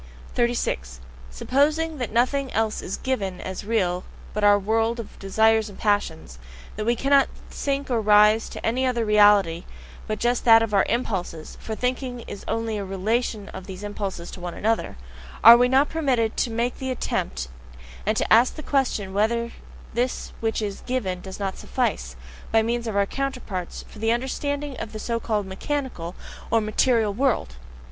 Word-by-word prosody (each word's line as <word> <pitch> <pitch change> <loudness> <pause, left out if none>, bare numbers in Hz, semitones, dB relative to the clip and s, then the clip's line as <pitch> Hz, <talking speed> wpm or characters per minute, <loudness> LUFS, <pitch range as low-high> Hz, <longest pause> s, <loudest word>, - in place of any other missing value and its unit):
36. 65 - -1 0.3
Supposing 300 - 0
that 245 - -3
nothing 255 +4 +1
else 220 -1 0
is 190 - -4
"given" 195 -9 -2
as 190 +2 -5
real 185 -5 0 0.3
but 210 - -2
our 205 0 +7
world 225 +3 0
of 225 - -9
desires 220 +2 +2
and 200 - -12
passions, 165 - -1 0.4
that 215 +1 -4
we 240 - +3
cannot 275 +3 +3 0.2
sink 280 -1 -2
or 235 -2 +2
rise 210 +1 +5
to - - -7
any 245 +4 +1
other 245 -3 +1
"reality" 205 -5 +5 0.4
but 215 - -2
just 240 +2 0
that 225 -1 +7
of 220 -2 -3
our 195 - +3
impulses 190 -9 -3
for 220 - -4
thinking 250 0 -2
is 205 - -8
only 225 -2 -1
a - - -3
relation 205 +2 -1
of 190 0 -9
these 190 +1 -8
impulses 200 -4 -5
to - - -9
one 175 -1 -5
another: 220 - -1 0.5
are 230 +2 +12
we 245 +1 +4
not 270 +3 +4
permitted 255 -9 0
to - - 0
make 235 +2 -2
the 265 - -3
attempt 65 - -2 0.6
and - - 0
to - - +2
ask 235 +3 +5
the 310 - -8
question 245 -10 0
whether 235 +3 +1 0.4
this 245 +2 -2
which 225 -1 -1
is 200 -2 -4
"given" 195 -8 -2
does 190 +1 -8
not 195 -1 -3
SUFFICE, 255 -2 -2 0.4
by 225 0 +4
means 235 +1 -1
of 220 - -3
our 200 0 +3
counterparts, 250 -8 -4
for 215 - -13
the 225 +1 +1
understanding 285 +4 -2
even 260 - -8
of 225 - -9
the 215 - -5
so 230 +1 -2
called 215 -3 -1
mechanical 190 - -4 0.3
(or 230 - +4
"material") 215 0 +2
world? 220 - 0
225 Hz, 175 wpm, -24 LUFS, 200-245 Hz, 0.6 s, are